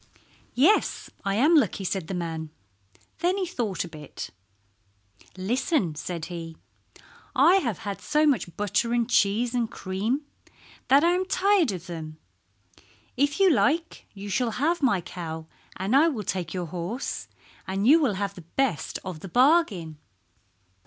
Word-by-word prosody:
"Yes, 320 - +2
I 195 -1 0
am 290 +10 +4
lucky," 275 -9 +2
said 185 -3 -2
the 190 - -3
man. 165 -2 -4 0.7
Then 355 +3 +1
he 385 - 0
thought 240 - -2
a - - -7
bit. 150 -4 -8 1.1
"Listen," 225 - 0
said 165 +2 -5
he. 165 -2 -7 0.8
"I 370 - +6
have 235 - -1
had 200 -3 -6
so 300 +1 +2
much 215 - 0
butter 210 +3 0
and 235 -1 +1
cheese 230 +1 +2
and 235 -2 0
cream 215 +10 -2 0.6
that 275 +4 +5
I 340 - +5
am 365 +1 +1
tired 380 - +3
of 180 -2 -6
them. 160 -3 -7 1.0
If 285 +4 +1
you 385 -2 +6
like 325 +2 +1
you 200 +1 -7
shall 230 +3 0
have 320 +6 +1
my 240 -10 +3
cow 160 -2 -6 0.3
and 195 +7 0
I 300 +4 +6
will 250 -10 -2
take 180 -3 -3
your 180 -2 -3
horse, 180 - -4 0.4
and 195 +2 -1
you 310 +7 +7
will 245 -9 +1
have 200 0 -2
the 180 - -11
best 195 - -1
of 180 -4 -5
the 190 - -9
bargain." 220 - +3
210 Hz, 155 wpm, -26 LUFS, 180-285 Hz, 1.1 s, you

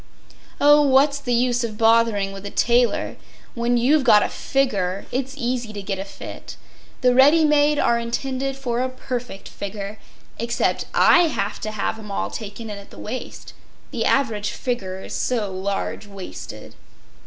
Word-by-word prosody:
Oh, 295 +1 +6
what’s 280 +1 +4
the 265 -3 -4
use 245 0 +2
of 215 -2 -4
bothering 225 -3 +3
with 195 0 -9
a - - -4
tailor—when 240 0 0
you’ve 275 +5 +3
got 215 -4 +6
a - - -1
figger 200 -9 -1
it’s 265 +2 -3
easy 245 -3 -2
to 205 - -5
get 195 -1 -3
a 195 - -4
fit—the 250 +4 -5
ready 290 +5 +6
made 295 0 +3
are 235 -4 +2
intended 265 +3 -2
for 245 -3 -2
a 260 - 0
perfect 250 -5 -6
figger—except 210 +3 -4
I 350 -1 +6
have 205 -9 -2
to 215 - -4
have 215 +1 -3
’em 210 -1 -10
all 200 - -2
taken 220 0 -7
in 205 - -6
at 200 - -14
the - - -14
waist—the 245 +4 -7
average 220 -7 +1
figger 190 -7 -4
is - - -8
so 215 -6 -1
large 200 +2 -3
waisted. 195 -2 -9
235 Hz, 155 wpm, -22 LUFS, 205-265 Hz, -, Oh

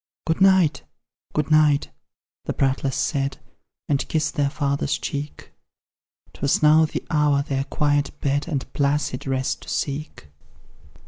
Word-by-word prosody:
Good 165 +3 -1
night! 190 -5 +4 0.5
good 150 0 -1
night! 150 -2 +4 0.5
the - - -2
prattlers 135 0 0
said, 135 +1 -1 0.5
And 140 -1 0
kissed 155 -2 0
their 145 -3 +1
father's 140 -1 -1
cheek; 145 +1 -6 0.8
'Twas 140 +2 0
now 155 +1 +6
the 155 - -5
hour 150 -2 +3
their 135 -1 -2
quiet 145 0 +1
bed 145 +2 0
And 145 -6 -4
placid 140 -2 -1
rest 130 0 -1
to - - -11
seek. 140 - -4
145 Hz, 130 wpm, -23 LUFS, 140-150 Hz, 0.8 s, now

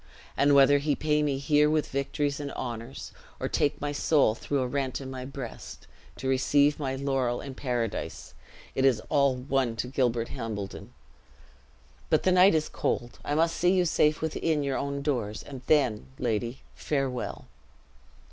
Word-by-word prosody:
And 145 0 +4
whether 140 +1 +6
he 145 0 0
pay 150 -1 +1
me 145 -2 0
here 150 +2 +3
with 155 -1 0
victories 140 +1 -1
and 145 -1 -4
honors, 120 +1 -6 0.3
or - - -1
take 145 - 0
my 145 0 -2
soul 145 -4 +3
through 140 +4 -2
a 130 - 0
rent 135 0 -2
in 135 -1 -7
my 130 -1 -6
breast, 135 -3 -8 0.3
to 130 - -5
receive 140 +3 +3
my 135 -2 -2
laurel 135 -3 0
in 135 - -7
paradise, 120 -5 -3 0.4
it 130 - 0
is 130 -5 +4
all 140 -3 +3
one 130 -2 -1
to 115 - -2
Gilbert 120 -3 0
Hambledon. 105 -4 -6 1.2
But - - +3
the 185 - +3
night 185 0 +6
is 155 -1 +1
cold: 120 -1 -2
I 145 - -1
must 165 +1 +2
see 180 +1 +3
you 180 -1 +3
safe 155 -1 +2
within 160 -1 0
your 140 -1 -1
own 140 0 -3
doors, 115 -7 -2
and 135 -3 -9
then, 130 -9 +2
lady, 120 +1 -2
farewell!" 135 -4 -3
140 Hz, 165 wpm, -28 LUFS, 125-145 Hz, 1.2 s, whether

